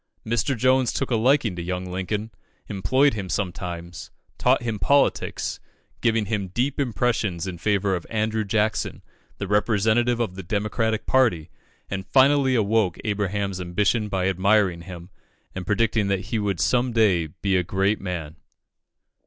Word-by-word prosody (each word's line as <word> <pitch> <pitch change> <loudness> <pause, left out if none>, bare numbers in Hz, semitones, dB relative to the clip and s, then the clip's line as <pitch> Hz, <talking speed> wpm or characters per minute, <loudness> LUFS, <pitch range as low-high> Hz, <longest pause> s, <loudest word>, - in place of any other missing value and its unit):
Mr. 120 +3 0
Jones 130 +1 +3
took 135 - -2
a - - +3
liking 120 -3 +2
to 85 - -5
young 90 +1 -3
Lincoln, 95 +4 -3 0.4
employed 130 +9 +2
him 100 -4 -5
sometimes, 90 -3 -4 0.3
taught - - +3
him 110 -3 -3
politics, 140 +10 +1 0.4
giving 115 -2 +2
him 100 -2 -2
deep 125 +10 -2
impressions 115 -8 0
in 90 -3 -6
favour 100 0 +1
of 85 - -6
Andrew 110 0 0
Jackson, 105 +1 -1 0.3
the - - -4
representative 110 +4 +2
of 115 -6 -1
the 95 - -7
Democratic 105 +4 -1
party, 90 -12 +2 0.4
and 95 -1 -5
finally 135 +3 +4
awoke 110 -4 +1
Abraham's 100 -2 -2
ambition 105 +5 0
by 95 -1 0
admiring 95 -1 +2
him, 85 +1 -10 0.4
and 95 -1 -6
predicting 110 0 +1
that 100 -1 0
he 115 - +1
would 100 -4 -1
some 125 +4 +1
day 100 -8 +3
be 95 +5 -2
a 90 - +3
great 95 +4 0
man. 85 -4 -5
105 Hz, 150 wpm, -24 LUFS, 95-115 Hz, 0.4 s, finally